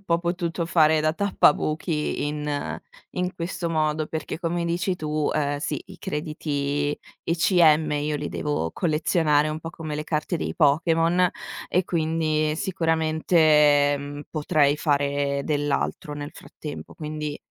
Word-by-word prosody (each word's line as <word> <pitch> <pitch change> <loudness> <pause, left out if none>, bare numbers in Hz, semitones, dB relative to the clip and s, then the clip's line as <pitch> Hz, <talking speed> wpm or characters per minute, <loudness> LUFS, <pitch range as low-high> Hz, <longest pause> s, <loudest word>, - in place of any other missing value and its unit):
un - - -29
po' 170 -2 +1
potuto 170 -1 -2
fare 160 -2 +4
da 155 0 +2
tappabuchi 155 -5 +1
in 150 -1 -3 0.3
in 180 0 -2
questo 170 0 -3
modo, 155 -1 0
perché 155 0 -5
come 170 0 -1
dici 175 +2 0
tu, 155 -2 -1
ehm, 145 -1 0
sì, 170 - -3
i - - -13
crediti 145 -3 -2 0.3
ECM 165 -2 +4
io 150 +1 -1
li 145 0 -3
devo 145 - -2
collezionare 155 -2 +2
un 155 +1 -3
po' 165 +1 -7
come 155 -4 -6
le 150 - -4
carte 155 +2 -1
dei - - -3
Pokémon 165 +3 +3 0.4
e 180 0 +1
quindi, 155 -2 0
sicuramente, 155 -4 +3
mhmm, 145 +1 -7
potrei 150 -2 +2
fare 140 -2 0
dell'altro 145 0 -1
nel 145 0 -6
frattempo. 150 -2 -9
Quindi, 150 -2 -4
155 Hz, 135 wpm, -24 LUFS, 150-165 Hz, 0.4 s, fare